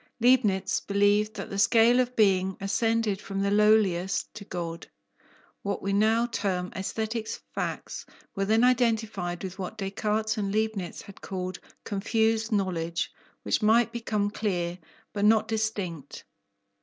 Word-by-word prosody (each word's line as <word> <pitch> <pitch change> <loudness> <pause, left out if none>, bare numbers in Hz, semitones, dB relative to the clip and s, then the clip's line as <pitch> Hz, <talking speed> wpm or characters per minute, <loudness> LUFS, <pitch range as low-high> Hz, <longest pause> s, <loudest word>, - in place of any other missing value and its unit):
Leibnitz 230 -6 +3
believed 205 +1 +2
that - - -6
the 195 - -3
scale 230 +3 +5
of 250 0 0
being 190 -3 +3
ascended 220 0 0
from 195 0 -5
the 200 0 +1
lowliest 205 -3 +2
to 215 - -9
God. 170 -4 -5 0.7
What 200 -1 -3
we 195 0 -1
now 220 +3 +3
term 195 -6 -2
aesthetic 220 +3 -3 0.3
facts - - -4 0.3
were 195 - 0
then 220 +3 +3
identified 220 -8 +1
with 190 +1 -6
what 190 +4 -5
Descartes 215 +2 -1
and 200 -1 -1
Leibnitz 215 -4 -2
had 200 - -13
called 185 -1 -5 0.2
"confused" 220 +2 0
knowledge, 170 -5 -1 0.3
which - - 0
might 230 +2 +4
become 215 -3 -1
"clear," 180 -5 -2 0.3
but 205 - -2
not 215 +1 +4
distinct. 200 -9 -3
205 Hz, 135 wpm, -27 LUFS, 190-220 Hz, 0.7 s, scale